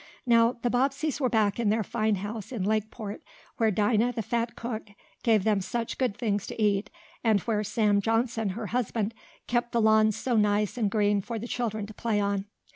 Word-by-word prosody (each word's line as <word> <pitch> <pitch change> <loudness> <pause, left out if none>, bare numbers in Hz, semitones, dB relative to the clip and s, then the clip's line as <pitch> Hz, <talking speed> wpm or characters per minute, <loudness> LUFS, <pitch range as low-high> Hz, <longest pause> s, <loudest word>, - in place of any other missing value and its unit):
Now 230 0 +5
the 240 - +1
Bobbseys 275 +4 0
were 255 - +2
back 215 -2 +2
in 225 -3 +2
their 220 +1 +2
fine 215 +1 0
house 205 +3 -6
in 230 -7 -3
Lakeport, 215 0 -2 0.4
where 225 -2 +3
Dinah, 215 +4 +2
the 225 - -3
fat 235 +3 -1
cook, 230 -2 -5 0.3
gave 220 -4 +3
them 210 -2 +2
such 230 +4 -3
good 250 -6 0
things 205 -4 -1
to - - -7
eat, 205 -1 +1 0.3
and 220 -3 +4
where 215 -1 0
Sam 210 -1 +2
Johnson, 225 0 0
her 230 - -4
husband, 230 -3 -1 0.3
kept 240 0 -1
the 235 - +2
lawns 220 -1 +4
so 250 -2 -1
nice 210 -1 +2
and 220 -5 +1
green 205 -1 +2
for 230 +3 -5
the 230 +2 -5
children 220 -4 -2
to 215 - -10
play 215 -1 -1
on. 200 -1 0
220 Hz, 200 wpm, -28 LUFS, 205-235 Hz, 0.4 s, Now